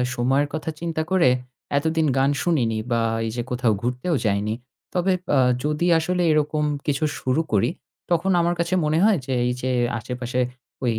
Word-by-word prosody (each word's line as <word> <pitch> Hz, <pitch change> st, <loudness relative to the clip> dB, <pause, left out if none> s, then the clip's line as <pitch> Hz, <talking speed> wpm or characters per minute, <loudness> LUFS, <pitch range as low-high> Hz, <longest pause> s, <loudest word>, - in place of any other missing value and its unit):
সময়ের 135 Hz, +4 st, +2 dB
কথা 155 Hz, 0 st, -3 dB
চিন্তা 165 Hz, -2 st, -2 dB
করে 185 Hz, -8 st, +5 dB, 0.5 s
এতদিন 160 Hz, +2 st, +1 dB
গান 135 Hz, +1 st, +3 dB
শুনিনি 125 Hz, -10 st, +1 dB
বা 115 Hz, -1 st, +2 dB, 0.2 s
এই 110 Hz, -, -2 dB
যে 120 Hz, -, -2 dB
কোথাও 120 Hz, -2 st, +2 dB
ঘুরতেও 125 Hz, +8 st, -1 dB
যাইনি। 105 Hz, +1 st, 0 dB, 0.4 s
তবে 185 Hz, +1 st, +1 dB, 0.2 s
আ -, -, +4 dB, 0.3 s
যদি 150 Hz, +4 st, 0 dB
আসলে 180 Hz, +2 st, -1 dB
এরকম 150 Hz, 0 st, +1 dB, 0.2 s
কিছু 145 Hz, +2 st, 0 dB, 0.2 s
শুরু 130 Hz, +5 st, +1 dB
করি 110 Hz, +4 st, +3 dB, 0.4 s
তখন 175 Hz, +3 st, +2 dB
আমার 170 Hz, +1 st, +1 dB
কাছে 170 Hz, +1 st, 0 dB
মনে 155 Hz, +2 st, +2 dB
হয় 215 Hz, -2 st, +5 dB
যে, 130 Hz, -, -2 dB
এই -, -, +1 dB
যে 130 Hz, -, -1 dB, 0.3 s
আশেপাশে 125 Hz, +2 st, -4 dB, 0.4 s
ঐ -, -, +1 dB
145 Hz, 170 wpm, -23 LUFS, 125-165 Hz, 0.5 s, করে